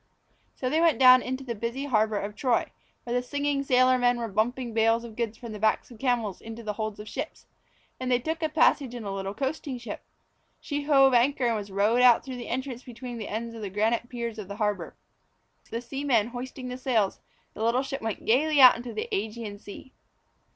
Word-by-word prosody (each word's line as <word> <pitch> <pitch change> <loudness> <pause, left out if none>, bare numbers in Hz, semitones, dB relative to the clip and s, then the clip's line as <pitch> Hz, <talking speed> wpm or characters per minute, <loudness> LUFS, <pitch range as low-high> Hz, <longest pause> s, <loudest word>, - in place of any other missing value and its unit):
So 255 - -3
they 310 +5 +2
went 335 -3 +4
down 255 -1 +8
into 260 +2 -4
the 245 -3 -4
busy 235 +5 -4
harbour 220 -5 +1
of 205 +1 -4
Troy, 245 +1 0 0.3
where 240 - -4
the 245 - +2
singing 285 +2 -1
sailor 255 -1 +4
men 245 0 +3
were 235 -1 -3
bumping 235 +4 -1
bales 225 +1 +3
of 230 -2 -10
goods 230 -2 -3
from 235 -3 -8
the 210 - -7
backs 220 +3 +1
of 230 - -13
camels 235 -6 -1
into 225 +1 -8
the 210 -1 -3
holds 215 -1 -4
of 210 - -7
the - - -10
ships, 285 +4 -6 0.5
and 255 0 -3
they 245 - +5
took 320 +6 -4
a 315 - 0
passage 290 -5 +2
in 240 - -6
a 200 - -4
little 195 +1 -4
coasting 270 +1 -3
ship. 240 -1 -7 0.6
She 290 -1 -4
hove 270 -3 +5
anchor 250 +2 +3
and 235 -1 +2
was 205 -2 -5
rowed 210 +5 +2
out 245 -2 +6
through 260 -2 -6
the 240 - -7
entrance 255 -1 -3
between 245 -1 -8
the 215 - -5
ends 230 +2 -4
of 225 - -8
the 205 - -4
granite 225 +4 0
piers 235 -2 -5
of 205 - -7
the 200 - -6
harbour. 205 -5 -2 0.7
The 230 - -4
seamen 245 -3 0
hoisting 255 +1 -7
the 250 - -5
sails, 230 -7 +1 0.3
the 220 - -5
little 240 +3 +2
ship 270 0 -5
went 225 -2 -4
gaily 290 +6 +3
out 255 -2 +10
into 240 0 -7
the - - -3
Ægean 210 0 -4
Sea. 260 +6 -11
240 Hz, 220 wpm, -27 LUFS, 220-260 Hz, 0.7 s, out